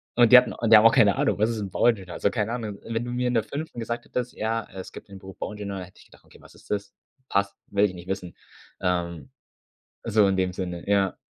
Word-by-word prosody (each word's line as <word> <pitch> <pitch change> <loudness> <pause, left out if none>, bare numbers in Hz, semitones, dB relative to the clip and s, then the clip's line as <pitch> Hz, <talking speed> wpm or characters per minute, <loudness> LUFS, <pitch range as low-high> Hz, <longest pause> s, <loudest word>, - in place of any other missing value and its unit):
Und 120 -1 +5
die - - +13
hatten 125 - +4 0.2
die 115 - +9
haben 105 +1 +7
auch 115 - +9
keine 100 -2 +5
Ahnung, - - +1
„was 110 +2 +2
ist 115 -2 -3
'n 100 - -4
Bauingenieur,“ 100 -5 +1
also, 100 - 0
keine 110 -1 -1
Ahnung. 110 -4 -4
Wenn 115 +1 -3
du 120 - -5
mir 125 0 -1
in 125 - 0
der 115 - +2
5. 145 +2 -6
gesagt 120 +1 -4
hättest: 125 -1 -4
„Ja, 110 0 -2
es 95 -1 -8
gibt - - -11
den 100 -1 -11
Beruf 95 0 -12
Bauingenieur“, 100 -2 -5
hätte 90 - -16
ich - - -18
gedacht: - - -21
„Okay, - - -19
was - - -17
ist - - -19
das? 100 -1 -2 0.4
Passt, 100 0 0
will 100 +1 +2
ich 95 - -2
nicht 90 0 -11
wissen.“ 95 -2 -5 0.5
Ähm, 85 -5 -2 0.7
so 105 -2 +3
in 95 - +1
dem 95 -1 0
Sinne, 90 -2 -5
ja. 100 -2 +2
100 Hz, 250 wpm, -25 LUFS, 95-115 Hz, 0.7 s, die